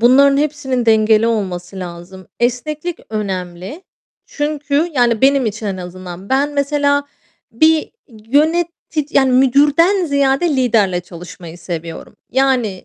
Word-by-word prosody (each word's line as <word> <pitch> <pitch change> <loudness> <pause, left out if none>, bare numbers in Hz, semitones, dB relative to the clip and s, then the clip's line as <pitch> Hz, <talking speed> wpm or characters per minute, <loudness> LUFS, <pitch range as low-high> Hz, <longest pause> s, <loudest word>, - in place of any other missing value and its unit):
bunların 275 +4 +5
hepsinin 275 -4 -1
dengeli 220 0 +4
olması 190 -4 -3
lazım. 180 +1 -9
Esneklik 300 +8 -2
önemli 190 - -5 0.4
çünkü, 295 +1 -1
yani, 240 -4 +2
benim 270 -2 +3
için 215 +1 -4
en 195 -2 -3
azından. 180 +1 -9
Ben 280 +2 +1
mesela 285 0 +1 0.5
bir 315 +6 +2 0.4
yönetici 315 +1 0
yani, 265 -2 +3
müdürden 290 +9 +3
ziyade 280 +2 +1
liderle 215 -8 +2
çalışmayı 175 -1 -11
seviyorum. 170 -1 -7
Yani 255 -8 0
250 Hz, 110 wpm, -17 LUFS, 190-285 Hz, 0.5 s, bunların